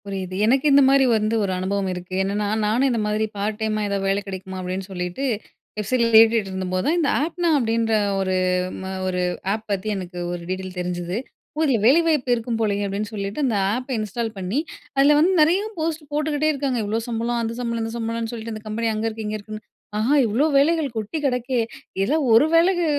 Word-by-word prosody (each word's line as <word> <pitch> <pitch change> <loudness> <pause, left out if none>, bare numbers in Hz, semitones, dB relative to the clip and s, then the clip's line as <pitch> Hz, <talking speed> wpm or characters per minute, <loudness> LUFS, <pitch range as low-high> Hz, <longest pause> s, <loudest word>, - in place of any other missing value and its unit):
புரியுது. 190 -2 -5
எனக்கு 265 +5 +2
இந்த 280 - +7
மாரி 275 0 +5
வந்து 215 +1 0
ஒரு 195 - -1
அனுபவம் 190 +1 -1
இருக்கு. 180 +1 -8
என்னென்னா, 205 +2 -1 0.2
நானும் 240 +6 +2
இந்த 235 - 0
மாரி 210 +1 0
பார்ட் 210 +2 -2
டைம்மா 215 -1 0
ஏதாவது 200 -1 -1
வேலை 195 +1 +1
கெடைக்குமா 190 0 -6
அப்படின்னு 185 +1 -4
சொல்லிட்டு 180 +6 -4 0.5
வெப்சைட்ல 230 +3 +1
தேடிட்டு 220 -2 +6
இருந்த 190 0 -3
போது 185 0 0
தான், 320 - +2
இந்த 295 -4 +2
"ஆப்னா" 340 +2 -1
அப்டீன்ற 230 -2 +1 0.3
ஒரு 190 -1 0 0.7
ஒரு 180 -1 -1 0.3
ஆப் 220 +1 -5
பத்தி 195 +1 -2
எனக்கு 180 -1 -7
ஒரு 175 -1 -4
டீட்டெயில் 185 0 -4
தெரிஞ்சது. 175 +1 -3 0.4
ஓ! - - -1
இதில 270 -5 +3
வேலைவாய்ப்பு 300 -2 +4
இருக்கும் 230 0 -3
போலயே 205 -2 0
அப்படின்னு 205 +2 -3
சொல்லிட்டு 200 +3 -4
அந்த 235 -5 +1 0.2
ஆப்ப 255 +2 -5
இன்ஸ்டால் 220 +2 -3
பண்ணி 190 +8 -1 0.4
அதில 285 +2 +6
வந்து 340 +5 +4
நெறைய 335 +6 +4 0.2
போஸ்ட் 320 -1 -2
போட்டுக்கிட்டே 300 0 0
இருக்காங்க. 275 -3 -1
இவ்ளோ 215 +2 -1
சம்பளம், 235 +1 -1
அந்த 225 0 -2
சம்பளம், 235 -1 -2
இந்த 225 0 -4
சம்பளம்ன்னு 230 0 -3
சொல்லிட்டு 230 -1 -5
இந்த 215 - -9
கம்பெனி 225 +2 -1
அங்க 215 +1 -2
இருக்கு, 220 -1 -5
இங்க 215 0 -2
இருக்குன்னு. 215 +1 -9 0.4
ஆஹா! 235 +7 +2
இவ்ளோ 235 +8 +2
வேலைகள் 295 -2 +2
கொட்டி 215 +8 -3
கிடக்கே. 250 -1 0 0.4
இதெல்லாம் 290 +9 +1
ஒரு 230 +6 +7
வேளைக்கு 350 +1 +4
225 Hz, 190 wpm, -22 LUFS, 200-265 Hz, 0.7 s, இந்த